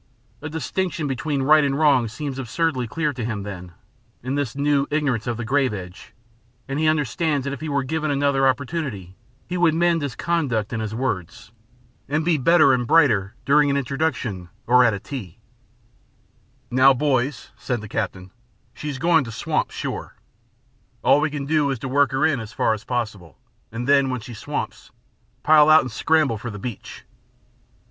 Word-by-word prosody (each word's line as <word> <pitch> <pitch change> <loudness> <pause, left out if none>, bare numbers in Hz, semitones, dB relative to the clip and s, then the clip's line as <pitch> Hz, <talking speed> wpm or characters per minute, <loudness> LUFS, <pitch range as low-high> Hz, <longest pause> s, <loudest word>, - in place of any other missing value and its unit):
A 150 - -5
distinction 160 +2 -3
between 140 +1 -2
right 155 +2 +5
and 140 -1 0
wrong 140 -6 +3
seems 135 +4 -5
absurdly 130 0 -1
clear 150 +5 -1
to 125 -2 -5
him, 110 -3 -3
then, 90 -3 -8 0.5
in 130 +2 -3
this 140 -5 -2
new 140 0 +1
ignorance 140 -7 -1
of 120 -2 -2
the 120 - -4
grave 130 -2 +1
edge, 90 -1 -10 0.5
and 135 +2 -3
he 155 - +2
understands 150 0 0
that 140 +1 -3
if 140 - -8
he 155 - -4
were 140 -1 0
given 155 +3 -2
another 140 -1 +2
opportunity 130 - -3 0.3
he 180 - -3
would 170 -3 +3
mend 170 -1 +2
his 140 -3 -4
conduct 130 -11 -1
and 110 - -2
his 110 0 -4
words, 110 -5 -4 0.6
and 155 +2 0
be 170 -1 +3
better 155 0 +5
and 125 -2 0
brighter 115 -12 +3
during 145 +1 +4
an 140 - +1
introduction 130 - -2 0.2
or 125 +1 +5
at 115 -4 +3
a - - -6
tea. 105 - -8 1.3
"Now, 130 +2 +5
boys," 130 -1 -1
said 120 -2 -3
the 105 - -8
captain, 95 -3 -4 0.4
"she 150 - -6
is 140 - -4
going 165 0 +3
to 115 - -7
swamp, 115 - -1
sure. - - -6 0.9
All 145 - +5
we 155 - +1
can 145 -1 -5
do 150 -1 +1
is 135 - -1
to 130 - -6
work 140 +1 +2
her 135 0 +1
in 145 -5 +1
as 110 -2 -8
far 110 - +1
as 110 0 -6
possible, 110 - -4 0.3
and 120 +3 -5
then 140 -1 +4
when 125 -1 -2
she 120 +1 -9
swamps, 110 - -5 0.5
pile 155 -1 +6
out 155 0 +8
and 130 - -6
scramble 140 -1 +1
for 120 - -6
the 105 - -7
beach. 115 +1 -8
135 Hz, 185 wpm, -22 LUFS, 115-150 Hz, 1.3 s, out